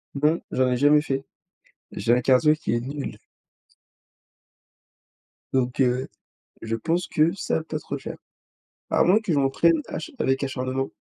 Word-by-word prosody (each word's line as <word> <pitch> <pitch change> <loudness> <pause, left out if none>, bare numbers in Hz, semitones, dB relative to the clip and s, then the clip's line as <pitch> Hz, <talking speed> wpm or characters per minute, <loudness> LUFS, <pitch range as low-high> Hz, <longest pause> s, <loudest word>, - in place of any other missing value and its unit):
Non, 150 +4 +2
j'en 130 0 +2
ai 125 - +1
jamais 145 +3 +5
fait. 135 -2 -2 0.7
J'ai 115 +4 +2
un 125 - +1
cardio 135 +5 +4
qui 155 - -3
est 120 - +1
nul. 135 -4 -6 2.4
Donc 125 -1 0
heu, 125 0 +1 0.5
je 115 0 -2
pense 165 +9 -1
que 155 +2 +2
ça - - -2
va 160 - -1
pas 155 -1 -4
trop 145 - -5
le 140 - -8
faire. - - -7 0.7
À - - +3
moins 190 +4 +5
que 195 - -2
je 145 - +2
m'entraîne 150 +4 +3
acha 155 - -6
avec 135 - 0
acharnement. 130 0 -2
135 Hz, 165 wpm, -24 LUFS, 130-155 Hz, 2.4 s, jamais